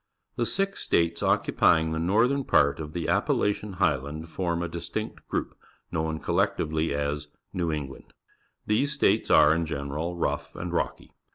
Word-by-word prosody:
The - - 0
six 195 0 0
states 85 0 +1
occupying 80 0 +3
the 80 - -1
northern 115 +11 +2
part 70 - +3
of 75 -1 -6
the 85 -1 -3
Appalachian 105 0 0
Highland 75 -2 -1
forma 85 0 -2
di.stinct 80 - -6
group, - - -3 0.4
known 80 0 -2
collectively 80 +1 0
as 75 +1 -2 0.3
A'eiv 85 -3 0
England. 70 -3 -8 0.5
These 135 +8 +1
states 140 - +2
are, 75 +1 +7
in 85 0 -1
general, 75 +4 -3
rough - - -2
and 85 0 -5
rock}'. - - -1
80 Hz, 145 wpm, -27 LUFS, 75-90 Hz, 0.5 s, are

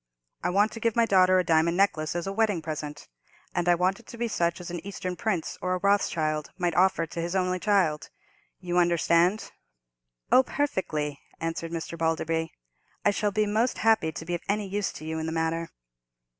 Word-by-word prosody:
I - - +1
want 205 +4 +3
to 225 - -7
give 230 -1 0
my 235 -1 +4
daughter 185 -3 +5
a 185 - +3
diamond 165 0 +2
necklace 165 -6 +1
as 175 - -2
a 195 - -3
wedding 205 -6 +1
present, 150 -2 -6 0.5
and 175 0 0
I 175 - +6
want 185 +4 +1
it 235 - -19
to 235 - -10
be 235 0 -1
such 170 -5 0
as 175 -1 -7
an 175 - -5
Eastern 190 -2 -5
prince 185 -5 -2
or 185 0 0
a - - -1
Rothschild 165 -6 +1
might 175 -2 0
offer 180 0 +3
to 165 +1 -5
his 175 +2 -3
only 185 -1 +1
child. 180 -7 +1 0.5
You 180 -1 0
understand?" 175 +3 +2 0.8
"Oh, 255 - +8
perfectly," 160 - -2 0.2
answered 165 0 -3
Mr. 170 0 -5
Balderby; 160 0 0 0.5
"I 205 - +5
shall 205 0 0
be 215 +1 +1
most 220 +4 +1
happy 220 -8 +3
to 160 - -7
be 175 - -3
of 175 - -2
any 205 0 0
use 205 +1 -1
to 155 - -9
you 160 0 -3
in 160 - -3
the - - -2
matter." 165 +1 -1
175 Hz, 200 wpm, -27 LUFS, 165-200 Hz, 0.8 s, Oh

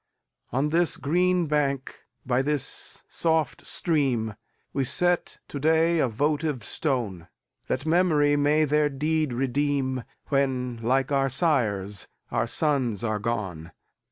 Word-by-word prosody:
On 140 +5 0
this 170 +1 +2
green 180 +4 +2
bank, 140 -3 -1 0.3
by 125 0 +2
this 145 -1 -2
soft 160 -2 0
stream, 130 - +1 0.4
We 135 - 0
set 175 +7 +1
to 140 - -5
day 160 +3 +3
a 135 - +3
votive 145 +2 -1
stone; 110 - -2 0.4
That 140 - -2
memory 160 -3 +3
may 150 +2 +3
their 150 0 +2
deed 155 +1 0
redeem, 130 0 0 0.3
When, 130 -4 0
like 130 +4 +1
our 135 -1 +2
sires, 110 - 0 0.2
our - - 0
sons 130 -9 0
are 110 -2 -1
gone. 95 -8 -4
140 Hz, 125 wpm, -26 LUFS, 125-155 Hz, 0.4 s, day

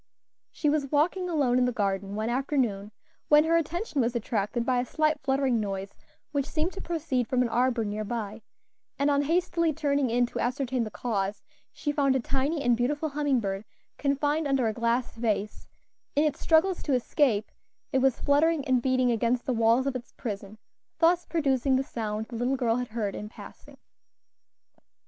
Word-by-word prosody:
She 305 - -2
was 290 -2 +1
walking 355 +5 +1
alone 270 -7 +2
in 250 - +3
the 250 - +1
garden 200 -3 -2
one 220 +2 -1
afternoon, 245 -6 -1 0.4
when 300 0 +6
her 330 +1 +2
attention 335 - 0
was 240 +1 0
attracted 230 0 -1
by 250 -1 +2
a 245 - -1
slight 305 +1 +1
fluttering 265 -3 +1
noise 195 -2 -4 0.4
which 285 -2 -1
seemed 325 +3 -1
to 390 - -7
proceed 295 -8 -1
from 250 0 +2
an 240 - -1
arbor 240 -1 +1
near 210 +1 -3
by, 220 0 -4 0.6
and 280 +1 +2
on 285 0 +3
hastily 335 +1 +1
turning 285 -3 0
in 245 +1 +3
to - - -6
ascertain 250 0 -1
the - - -5
cause, 205 -2 -3 0.3
she 295 - -3
found 275 -2 +2
a - - +2
tiny 280 +5 -1
and 245 -2 +4
beautiful 290 +6 -1
humming 285 -2 +1
bird 195 -2 -3 0.4
confined 290 +2 +1
under 270 -4 +2
a 220 - 0
glass 235 +2 0
vase; 215 -3 -2 0.5
in 290 - +4
its 305 -2 0
struggles 345 +3 +3
to 285 - -1
escape 250 -3 +1 0.4
it 265 - +4
was 265 -1 +2
fluttering 295 +1 +2
and 255 -2 +3
beating 255 -1 +2
against 235 +2 0
the 260 - 0
walls 230 +3 +3
of 275 -2 -1
its 245 -1 -7
prison, 210 -3 -6 0.4
thus 345 +1 +3
producing 275 -5 +1
the 265 - +2
sound 220 -4 -4
the 235 - -9
little 245 +3 0
girl 235 -2 +1
had 250 0 -2
heard 215 -3 -3
in 210 - -6
passing. - - -13
255 Hz, 185 wpm, -27 LUFS, 230-290 Hz, 0.6 s, when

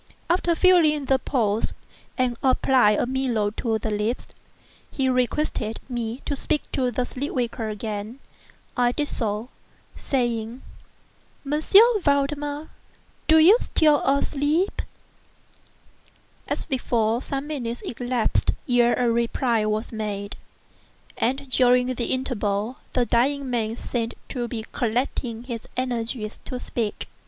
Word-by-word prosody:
After 345 -1 +2
feeling 320 -5 +4
the 265 0 +3
pulse 225 -6 0 0.4
and 255 -2 +1
applying 255 -5 +4
a - - +1
mirror 245 -5 0
to 225 -3 0
the 220 0 -3
lips, 210 +4 -1 0.6
he 270 -2 -1
requested 250 -3 0
me 240 -1 -4
to 285 - -1
speak 300 +2 0
to 255 -2 +1
the 245 +1 -1
sleep 270 +3 -5
waker 235 -3 -2
again. 215 +2 -5 0.6
I 245 -1 +2
did 295 +2 -1
so, 220 +1 -2 0.5
saying: 240 -2 -2 0.8
"M. 295 +2 0 0.4
Valdemar, 290 +1 0 0.6
do 320 - +7
you 365 +9 +7
still 290 -3 +3
sleep?" 305 +6 0 1.7
As - - -2
before, 235 -4 0
some 275 +1 -3
minutes 245 -6 -4
elapsed 245 -1 0
ere 240 -1 +4
a 245 - +1
reply 235 -1 +1
was 215 +2 -2
made; 205 -2 -4 0.8
and 270 +3 -1
during 250 0 +4
the 240 -1 -2
interval 230 -3 -1 0.2
the 250 -2 +2
dying 270 +4 +1
man 225 -2 -1
seemed 235 -1 -3
to 240 -2 -3
be 225 -2 -5
collecting 235 0 -1
his 235 -3 -6
energies 235 -3 -3
to 255 - -4
speak. 225 -4 -3
245 Hz, 125 wpm, -24 LUFS, 225-275 Hz, 1.7 s, do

